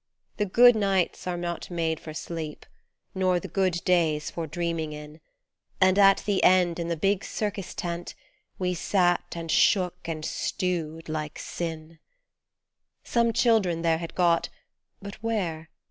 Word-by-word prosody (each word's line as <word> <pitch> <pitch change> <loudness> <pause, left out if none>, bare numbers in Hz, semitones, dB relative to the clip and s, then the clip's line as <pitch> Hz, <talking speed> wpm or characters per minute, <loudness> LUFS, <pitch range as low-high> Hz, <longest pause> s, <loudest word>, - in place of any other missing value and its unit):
The 210 - 0
good 245 +5 +7
nights 195 -4 0
are 180 -1 -2
not 175 -1 -4
made 165 -2 -1
for 155 - -9
sleep, 155 0 -6 0.5
nor 185 -1 +1
the - - -7
good 185 -3 0
days 160 -4 +2
for 165 -2 -4
dreaming 165 -1 -3
in, 150 +1 -10 0.6
And 185 +1 +4
at 195 -1 +6
the 200 -2 +1
end 180 -2 +4
in 170 - -2
the 170 -1 -2
big 195 +4 +1
Circus 200 -4 -4
tent 175 0 -4 0.4
we 180 -1 -1
sat 175 0 +1
and 165 -1 -4
shook 180 -4 +2
and 155 -2 -4
stewed 165 -4 -3
like 155 -1 -4
sin 160 -1 -6 1.0
Some 235 -1 +2
children 210 -8 +2
there 165 -1 +2
had 170 -1 -7
got 170 -2 +2 0.5
but 200 +1 -9
where 175 -8 -2
175 Hz, 145 wpm, -26 LUFS, 165-190 Hz, 1.0 s, good